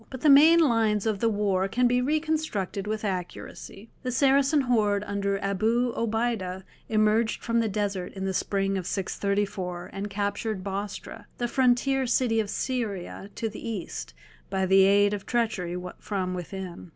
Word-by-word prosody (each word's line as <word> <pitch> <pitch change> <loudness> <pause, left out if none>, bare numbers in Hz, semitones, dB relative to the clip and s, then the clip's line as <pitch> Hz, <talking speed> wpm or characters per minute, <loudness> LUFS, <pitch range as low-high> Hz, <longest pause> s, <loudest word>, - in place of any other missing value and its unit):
But 260 -2 -8
the 300 - +6
main 310 +4 +8
lines 225 -8 +2
of 215 -3 0
the 230 - +2
war 200 -3 +1
can 245 +5 +1
be 245 +1 +3
reconstructed 300 - -1
with 215 0 -2
accuracy. 195 +3 -6
The 255 - -3
Saracen 275 +3 +3
horde 210 -5 +1
under 200 -1 -1
Abu 225 +5 +1
Obeida 220 -5 -1 0.3
emerged 215 +1 +2
from 230 0 +1
the 225 -1 +1
desert 200 -3 -2
in 190 -1 -4
the 190 - -1
spring 195 0 0
of 180 - -6
634 195 -2 -2
and 200 +1 -4
captured 205 0 -2
Bostra, 200 +1 -5
the 240 - -1
frontier 260 +1 +2
city 235 -2 +2
of 210 -2 -1
Syria 205 -7 -3
to 225 - -2
the 215 - -8
east, 65 - -6 0.3
by 190 -1 0
the 190 +1 +6
aid 205 +1 +4
of 200 -2 -5
treachery 215 -7 -1 0.2
from 185 -3 -3
within. 180 0 -7
210 Hz, 160 wpm, -27 LUFS, 195-240 Hz, 0.3 s, main